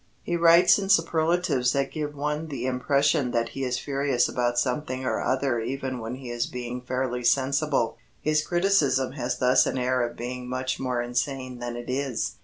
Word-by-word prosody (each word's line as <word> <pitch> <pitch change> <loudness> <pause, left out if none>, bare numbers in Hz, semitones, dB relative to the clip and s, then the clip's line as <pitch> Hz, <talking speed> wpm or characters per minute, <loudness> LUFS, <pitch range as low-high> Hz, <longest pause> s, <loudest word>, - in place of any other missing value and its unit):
He 175 - -2
writes 170 +3 +6
in 195 -1 -4
superlatives 165 -6 +2
that 140 -1 0
give 150 -1 -4
one 150 +2 -2
the 135 -5 -4
impression 140 +2 +1
that 115 -1 0
he 135 - -5
is 125 -1 -1
furious 140 -3 0
about 120 -1 -1
something 130 +1 -1
or - - 0
other 130 -2 0
even 130 +2 -3
when 115 +2 -5
he 130 -2 -8
is 120 0 -1
being 125 0 -5
fairly 125 0 -2
sensible. 135 0 +1 0.2
His 155 0 +1
criticism 155 -8 +2
has 130 -2 -3
thus 130 +1 +4
an - - -2
air 125 0 +1
of 120 0 -3
being 125 +1 -5
much 130 0 -2
more 125 -2 -1
insane 125 +1 -3
than 120 0 -4
it 120 0 -7
is. 130 -1 -2
130 Hz, 185 wpm, -26 LUFS, 125-145 Hz, 0.2 s, writes